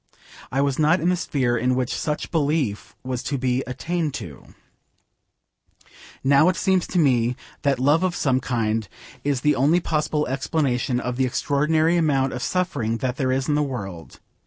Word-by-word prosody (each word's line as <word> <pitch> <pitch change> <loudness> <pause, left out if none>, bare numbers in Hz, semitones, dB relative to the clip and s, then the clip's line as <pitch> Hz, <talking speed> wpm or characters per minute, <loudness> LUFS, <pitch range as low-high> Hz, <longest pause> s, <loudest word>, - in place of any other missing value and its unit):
I 135 - +1
was 140 0 0
not 155 +4 +4
in 170 - +1
the 180 - +3
sphere 130 -8 0
in 125 +2 +1
which 125 -1 -1
such 150 -1 -3
belief 135 - -1
was 130 -1 -3
to 140 +2 -2
be 130 0 0
attained 155 +3 -2
to. 70 -6 -9 1.7
Now 140 +5 +5
it 185 - 0
seems 190 -1 +1
to 185 - -3
me 125 -6 +3 0.3
that 140 -3 +1
love 145 +6 +3
of 185 -2 0
some 130 -2 +1
kind 110 -5 -1 0.3
is 140 -3 0
the 150 +1 +3
only 145 +7 +3
possible 150 -2 -1
explanation 135 -2 -1
of 125 -1 -3
the 130 - +2
extraordinary 155 +6 +1
amount 135 -5 +1
of 125 - -5
suffering 140 -10 -1
that 125 +1 -2
there 130 -3 0
is 130 0 0
in 150 - +1
the 150 - +2
world. 100 - -6
135 Hz, 175 wpm, -23 LUFS, 125-155 Hz, 1.7 s, Now